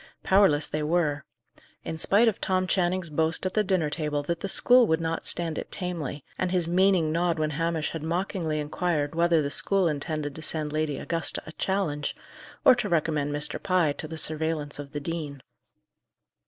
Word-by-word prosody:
Powerless 190 -7 +4
they 155 - -3
were: 150 -3 0 0.6
in 160 - -5
spite 210 +7 +4
of 220 - 0
Tom 185 -1 +1
Channing's 185 -1 0
boast 160 +3 +1
at 185 - -1
the 215 - +2
dinner 180 -6 0
table 150 -2 -2
that 170 +3 -3
the 195 - -4
school 245 +3 +5
would 160 0 +1
not 165 0 -3
stand 165 -2 0
it - - -8
tamely, 165 -7 -4 0.2
and 185 - 0
his 180 -3 +1
meaning 180 -2 +3
nod 170 +1 0
when 155 -1 -1
Hamish 165 0 -1
had 165 - -5
mockingly 165 -1 -2
inquired 150 0 -1
whether 170 -1 +2
the 140 - -3
school 195 +2 +3
intended 150 -1 -3
to 160 - -9
send 155 -1 -3
Lady 155 -2 -1
Augusta 165 +3 0
a 160 - -9
challenge, 165 -5 -2 0.5
or - - +9
to 240 -4 -2
recommend 155 -3 0
Mr. 150 0 -2
Pye 180 -6 +2
to 155 - -6
the 160 +1 -7
surveillance 155 -2 -1
of 140 -1 -8
the 145 - -4
dean. 145 -3 -5
160 Hz, 185 wpm, -26 LUFS, 150-180 Hz, 0.6 s, or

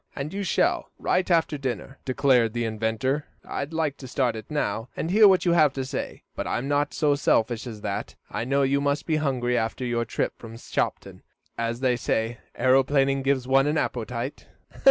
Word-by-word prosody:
"And 145 +4 -4
you 200 - -2
shall, 190 - +1
right 180 0 0
after 160 -4 +2
dinner," 135 +1 -4
declared 130 -4 +3
the 120 -1 -1
inventor. 110 +6 -1 0.2
"I'd 140 +2 -4
like 160 -3 -1
to 130 - -9
start 125 -2 0
it 110 - -8
now, 115 -6 -2
and 165 - -2
hear 210 +2 +7
what 190 -2 +4
you 175 - +4
have 155 -5 +4
to 135 -1 -3
say, 130 - -5
but - - -3
I'm 125 +3 -2
not 145 0 +1
so 150 -2 +2
selfish 120 -4 +1
as 110 -3 -8
that. - - -4
I - - -3
know 140 +3 +1
you 140 +1 +2
must 145 +1 0
be 160 -2 +1
hungry 125 -5 0
after 115 +2 -1
your 120 -1 0
trip - - -2
from 115 -1 -9
Shopton, - - -3 0.3
as 115 +1 -2
they 130 -2 +3
say 115 0 -1 0.2
aeroplaning 135 +1 +3
gives 135 -2 0
one 135 +1 +4
an 150 +2 +1
appetite." 125 0 -3
135 Hz, 195 wpm, -25 LUFS, 120-145 Hz, 0.3 s, hear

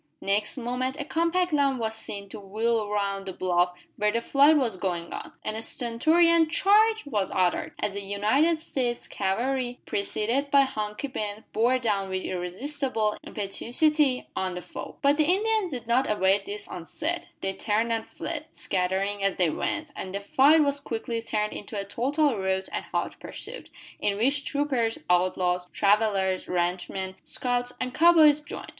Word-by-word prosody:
Next 210 +5 0
moment 255 +2 -2
a 290 - -3
compact 335 +2 0
line 280 -2 +2
was 220 -2 -2
seen 200 -2 -6
to - - -8
wheel 215 +2 -1
round 200 -1 -2
the 190 - -4
bluff 180 -1 +1 0.2
where 210 0 +2
the 230 - 0
fight 285 +6 +5
was 240 -8 0
going 175 -3 -3
on, - - -7
and 215 - -2
a 220 - -4
stentorian 320 +9 +3
"Charge!" 430 +5 +4
was 210 -9 -1
uttered, 180 -1 0
as 200 - -2
the 200 - -4
United 215 +12 +2
States 255 -6 -2
cavalry, 245 +5 -1
preceded 230 +7 -1
by 280 0 +6
Hunky 215 -1 -3
Ben, 215 -4 -5
bore 240 +3 +3
down 205 -6 -1
with 185 0 -2
irresistible 215 +5 -2
impetuosity 255 +7 +1
on 185 -1 -2
the 180 - -5
foe. - - -8
But 285 +1 +4
the 310 - +3
Indians 420 0 +1
did 245 -4 -5
not 245 +4 +2
await 195 -1 +2
this 205 0 -5
onset. 320 - -4
They 195 0 -2
turned 220 +3 0
and 225 -1 -2
fled, - - -4
scattering 195 +2 -1
as 195 -1 +1
they 175 -4 +2
went, 315 - -3
and 190 +1 -6
the - - -1
fight 280 +9 +5
was 285 0 +1
quickly 230 -3 -4
turned 210 -2 -1
into 205 0 -6
a 200 - -4
total 270 +3 0
rout 190 0 -1
and - - -3
hot - - -3
pursuit, - - -8 0.3
in 200 -1 0
which 275 +6 +1
troopers, 265 -7 0
outlaws, 180 0 +1
travellers, 200 -2 +1
ranch 180 0 -1
men, 190 0 -5
scouts, 245 0 +1
and 255 0 -3
cow 340 +4 +6
boys 305 -3 +6
joined. 295 - -7
225 Hz, 170 wpm, -26 LUFS, 195-280 Hz, 0.3 s, by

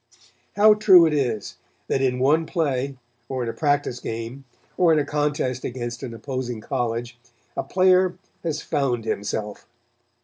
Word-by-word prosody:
How 210 +1 +7
true 190 -5 +7
it 160 - +1
is 120 -8 -2 0.3
that 135 - 0
in 130 -1 +1
one 150 +5 +2
play, 140 -5 -1 0.3
or 130 -2 -2
in 115 - -3
a - - -4
practice 145 -5 0
game, 115 +5 -6 0.3
or 175 -2 +4
in 160 - +4
a 145 - +1
contest 145 -4 -1
against 120 -1 -5
an 125 - -5
opposing 125 0 -4
college, 120 0 -3 0.4
a - - 0
player 185 -1 +3 0.2
has 155 -3 -3
found 125 -5 -1
himself. 105 -1 -3
135 Hz, 150 wpm, -23 LUFS, 120-155 Hz, 0.4 s, How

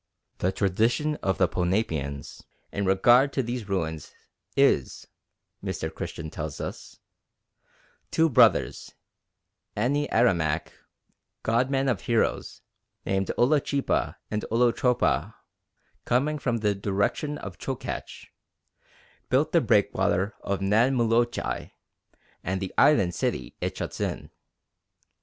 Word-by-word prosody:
The 95 - +1
tradition 115 +11 +1
of 95 - -1
the 90 - +3
Ponapeans 80 -6 -2 0.3
in 100 - -2
regard 120 +8 +5
to 135 - 0
these 120 -3 -5
ruins 80 -5 -3 0.5
is, - - +2 0.6
Mr. - - -4
Christian 80 -2 -6
tells 75 -1 -5
us, - - -7 1.1
"Two 160 - +3
brothers, 140 - +3 0.8
Ani 140 +7 +1
Aramach, 85 -9 +1 0.7
Godmen 130 +4 +1
or 125 - +2
Heroes, 115 -2 -1 0.4
named 95 -1 0
Olo 145 +5 +4
chipa 140 0 -1 0.2
and 105 0 -2
Olo 120 +2 +3
chopa, 110 - +1 0.7
coming 145 +5 +1
from 125 -3 0
the 105 -2 +1
direction 100 +9 -1
of 95 -8 -9
Chokach, - - -5 1.0
built - - +2
the - - +4
breakwater 100 +3 +2
of 100 -1 -2
Nan 115 +7 +3
Moluchai 120 0 0 0.7
and 95 +1 -2
the 95 -1 -5
island 100 -13 +4
city - - -2
it - - -3
shuts - - -5
in. - - -3
110 Hz, 110 wpm, -26 LUFS, 95-125 Hz, 1.1 s, regard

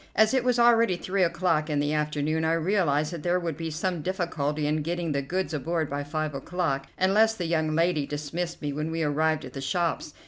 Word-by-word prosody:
As 220 +2 +4
it 260 -2 +2
was 250 -1 +2
already 230 -4 +5
three 190 +2 -1
o'clock 165 -3 +1
in 150 -1 0
the 145 +1 0
afternoon, 150 +1 0
I 160 +1 +2
realized 165 -3 +1
that 170 - -5
there 175 +3 +1
would 165 -3 -3
be 165 +1 -4
some 170 +2 -2
difficulty 155 -5 -2
in 150 +1 +1
getting 170 +1 -2
the 140 -1 0
goods 180 +6 -2
aboard 160 +1 -1
by 145 0 -2
five 155 +1 -3
o'clock, 140 -1 -2
unless 215 +4 +4
the 180 - -3
young 160 -2 0
lady 165 -3 +1
dismissed 165 +4 -4
me 145 -1 -2
when 150 +2 -3
we 165 0 -1
arrived 155 +1 +1
at - - -10
the 135 - -5
shops. 165 +1 -1
160 Hz, 215 wpm, -27 LUFS, 150-180 Hz, -, already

